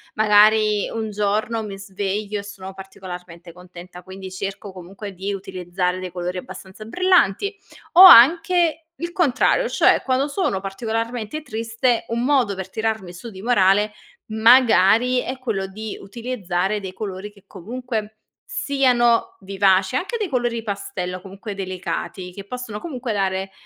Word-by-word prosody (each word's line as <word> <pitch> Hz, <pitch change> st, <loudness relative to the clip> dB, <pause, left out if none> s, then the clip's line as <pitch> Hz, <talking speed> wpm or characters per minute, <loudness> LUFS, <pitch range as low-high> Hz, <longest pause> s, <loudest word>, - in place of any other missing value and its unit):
Magari 215 Hz, 0 st, +4 dB
un 220 Hz, -1 st, -4 dB
giorno 210 Hz, +2 st, -1 dB
mi 205 Hz, -2 st, -7 dB
sveglio 200 Hz, +1 st, -4 dB
e -, -, -7 dB
sono 195 Hz, -2 st, -9 dB
particolarmente 180 Hz, -3 st, -10 dB
contenta, 180 Hz, 0 st, -12 dB
quindi 190 Hz, +1 st, -10 dB
cerco, 195 Hz, +1 st, -6 dB
comunque, 190 Hz, +3 st, -9 dB
di 195 Hz, +2 st, -4 dB
utilizzare 185 Hz, -1 st, -3 dB
dei 185 Hz, -1 st, -6 dB
colori 180 Hz, +1 st, -4 dB
abbastanza 190 Hz, +2 st, -11 dB
brillanti, 370 Hz, -, +2 dB, 0.4 s
o 360 Hz, -, +9 dB
anche 330 Hz, +2 st, +7 dB, 0.2 s
il 340 Hz, +1 st, -4 dB
contrario, 345 Hz, -, +2 dB
cioè, -, -, +3 dB
quando 265 Hz, +2 st, 0 dB
sono 285 Hz, -, -1 dB
particolarmente 225 Hz, +6 st, -4 dB
triste, 230 Hz, -1 st, -1 dB
un 235 Hz, +1 st, -1 dB
modo 255 Hz, -7 st, +2 dB
per 190 Hz, 0 st, -6 dB
tirarmi 220 Hz, -3 st, -3 dB
su 185 Hz, +7 st, -9 dB
di 190 Hz, -3 st, -11 dB
morale, 210 Hz, -2 st, +3 dB, 0.4 s
magari, 230 Hz, +1 st, +5 dB
è 260 Hz, +1 st, -5 dB
quello 220 Hz, -7 st, -3 dB
di 215 Hz, +2 st, -7 dB
utilizzare 210 Hz, -4 st, -3 dB
dei 190 Hz, -2 st, -7 dB
colori 195 Hz, 0 st, -6 dB
che 205 Hz, -2 st, -22 dB
comunque 220 Hz, +2 st, -6 dB, 0.3 s
siano 250 Hz, -4 st, +1 dB
vivaci. 195 Hz, +2 st, +2 dB
Anche 430 Hz, -, -3 dB
dei 420 Hz, -5 st, -3 dB
colori 240 Hz, -4 st, -1 dB
pastello, 200 Hz, -3 st, -4 dB
comunque 195 Hz, +3 st, -9 dB
delicati, 185 Hz, -1 st, -5 dB
che 195 Hz, +2 st, -10 dB
possono 240 Hz, -1 st, -6 dB
comunque 255 Hz, -6 st, -5 dB
dare, 195 Hz, -1 st, -1 dB
210 Hz, 140 wpm, -21 LUFS, 190-240 Hz, 0.4 s, o